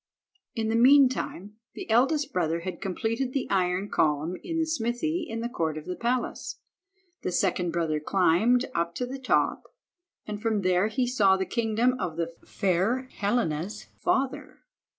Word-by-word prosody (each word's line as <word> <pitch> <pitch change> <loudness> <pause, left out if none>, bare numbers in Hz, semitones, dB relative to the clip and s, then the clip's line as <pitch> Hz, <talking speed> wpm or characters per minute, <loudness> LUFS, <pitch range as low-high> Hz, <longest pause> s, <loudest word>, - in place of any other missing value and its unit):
In 220 -2 -1
the 225 - +1
meantime 250 -5 +3 0.2
the - - -7
eldest 275 +6 +2
brother 170 -2 0
had 185 +1 -6
completed 230 +7 -2
the 275 - -1
iron 185 0 +1
column 155 0 +1
in 330 -2 -3
the 325 - +2
smithy 315 +4 -1
in 225 0 -4
the 235 - -1
court 160 -9 -2
of 155 - -7
the 180 - -4
palace. 240 +3 -2 0.7
The - - -2
second 180 -1 +1
brother 165 -3 0
climbed 195 - +3
up 170 0 -1
to 250 - -2
the 265 +2 -6
top, 260 - +1 0.6
and 210 -1 -5
from 220 -2 0
there 185 +2 +3
he 250 +3 0
saw 205 -6 +3
the 190 - -1
kingdom 230 +3 +1
of 165 -7 -3
the 170 0 -2
fair 200 +8 0
Helena's 200 -2 -1
father. 265 0 -2
215 Hz, 160 wpm, -27 LUFS, 180-250 Hz, 0.7 s, meantime